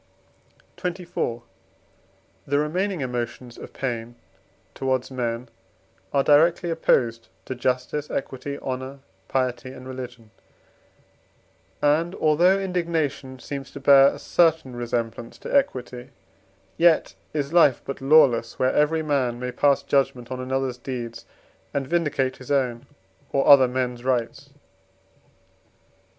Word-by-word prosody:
XXIV. 175 -10 -3 1.0
The 140 +1 +1
remaining 175 +4 -1
emotions 120 -1 -4
of - - -10
pain 120 -2 -4 0.6
towards 130 -1 -1
men 120 -1 -3 0.6
are 140 -1 +2
directly 165 +4 +4
opposed 115 -8 +1 0.2
to - - -4
justice, 130 +4 -2
equity, 140 +1 -4
honour, 130 +1 -5 0.3
piety, 130 0 -1
and 130 0 -11
religion; 125 -4 -8 1.5
and, 160 +5 +2
although 175 +5 +3
indignation 165 -8 -2
seems 135 +2 -7
to - - -7
bear 135 0 +7
a - - -1
certain 160 -7 +1
resemblance 120 -1 -4
to - - -5
equity, 125 - -1 0.7
yet 170 -1 +4 0.2
is 145 0 -3
life 150 -7 +5
but 135 - -6
lawless, 135 -5 +4
where 130 0 +1
every 155 +2 +2
man 130 -5 0
may 125 0 -3
pass 140 +1 +2
judgment 130 -3 0
on 130 - -4
another's 130 -1 -2
deeds, 120 -3 -6 0.5
and 140 -1 0
vindicate 140 -4 0
his 130 - -13
own 125 -4 0 0.4
or 135 - +1
other 135 -3 +8
men's 125 -1 -3
rights. 130 +2 -2
135 Hz, 115 wpm, -24 LUFS, 125-150 Hz, 1.5 s, other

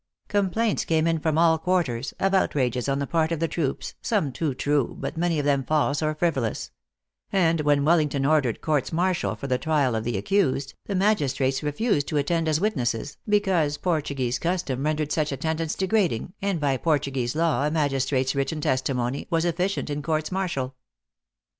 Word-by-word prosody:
Complaints 205 +2 +1
came 160 -1 +1
in 165 -1 +1
from 155 0 0
all 165 -1 +4
quarters, 155 -9 0
of 195 0 +1
outrages 130 -9 +1
on 135 - +1
the 140 - -1
part 160 +2 0
of 165 - -1
the 165 - +1
troops, 150 -5 -3
some 195 - 0
too 145 0 -2
true, 145 -1 0
but - - -4
many 170 0 0
of 145 - -1
them 140 -2 +2
false 145 +1 +1
or 155 0 0
frivolous; 155 -9 -1 0.6
and 165 -4 +2
when 145 -1 +2
Wellington 150 -4 +2
ordered 145 -6 +2
courts 150 -4 0
martial 180 +2 0
for - - -8
the 130 -2 0
trial 145 -4 +1
of 110 -1 -1
the 115 -3 -2
accused, 135 - 0
the 200 - -2
magis 185 -9 +2
trates 135 0 0
refused 150 - 0
to 150 - -1
attend 165 +3 +1
as 155 -1 +2
witnesses, 140 - -1
because 185 -8 +2
Portu 155 -5 -1
guese 125 -1 -1
custom 170 -7 -1
rendered 155 -1 -1
such 155 -2 0
attendance 160 +3 -2
degrading, 185 - 0
and 195 -3 0
by 140 -3 +1
Portuguese 135 -5 0
law 160 -3 +2
a - - +1
magistrate 135 -3 +1
s - - +1
written 140 +3 -1
testi 130 -2 0
mony 125 +2 -2
was 165 -1 +1
efficient 180 0 -1
in 145 +1 -2
courts 155 +2 -1
martial. 170 -9 -2
155 Hz, 185 wpm, -25 LUFS, 135-170 Hz, 0.6 s, all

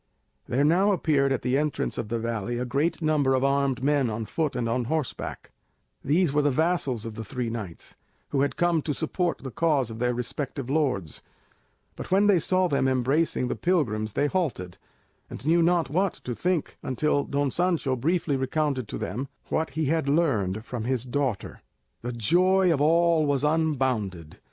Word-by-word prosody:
There 130 +4 +1
now 180 +7 +4
appeared 145 -6 +2
at 135 - -1
the 130 +2 +2
entrance 150 -1 -1
of 110 -3 -4
the 115 - -1
valley 115 0 -3
a 125 - -2
great 145 +7 -1
number 145 -4 +2
of 130 - 0
armed 140 -2 +1
men 140 -3 +2
on 110 +1 -3
foot 155 +4 -2
and 120 -2 -1
on 120 +1 0
horseback: 155 +1 -4 0.5
these 155 +2 +2
were 150 - +3
the 145 - +2
vassals 140 -6 0
of 115 - -5
the 110 - -6
three 120 +1 -4
knights, 105 -8 -7 0.3
who 135 - 0
had 140 - 0
come 175 -2 +2
to 145 -1 -3
support 170 +1 -2
the 130 - -5
cause 145 -5 +1
of 110 - -8
their 125 0 +1
respective 135 +2 -4
lords; 130 - -1 0.7
but - - -8
when 195 +2 +4
they 200 -4 +5
saw 185 +3 +2
them 140 -4 +1
embracing 130 +2 +1
the - - -2
pilgrims 110 - 0
they - - +1
halted, 140 - -2 0.5
and - - -9
knew 170 +2 +4
not 170 -1 +2
what 185 +3 +1
to 125 - -3
think 175 +4 -2
until 145 +2 0
Don 140 -1 -1
Sancho 170 -6 0
briefly 155 +3 0
recounted 135 -2 -1
to - - -5
them 130 +6 -4 0.2
what 160 0 0
he 160 - +1
had 155 0 0
learned 110 - +1
from 120 -4 -5
his 130 -1 -1
daughter. 125 -5 -2 0.4
The 120 - -4
joy 180 - +3
of 145 - -1
all 165 0 +3
was 140 -1 +1
unbounded. 130 - -1
140 Hz, 185 wpm, -26 LUFS, 125-160 Hz, 0.7 s, they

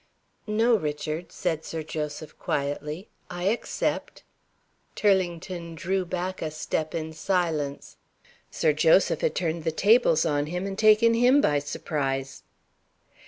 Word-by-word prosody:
"No, 225 +3 +3
Richard," 155 0 -4
said 165 -3 -2
Sir 160 -1 -5
Joseph, 150 0 -5
quietly, 150 +5 -3 0.2
"I 175 0 -5
accept." 230 - -2 0.7
Turlington 175 -3 0
drew 185 +4 -1
back 180 +1 -4
a 160 - -2
step 155 0 -3
in 160 -1 -4
silence. 160 -5 -2 0.5
Sir - - +1
Joseph - - +4
had 485 -2 0
turned 165 -1 -1
the 160 - 0
tables 200 -2 +4
on 145 -2 0
him, 180 +3 -3
and 200 - -3
had 195 - -7
taken 220 +1 +6
him 245 +4 +5
by 145 - +3
surprise. 135 -2 -3
165 Hz, 130 wpm, -26 LUFS, 150-195 Hz, 0.7 s, taken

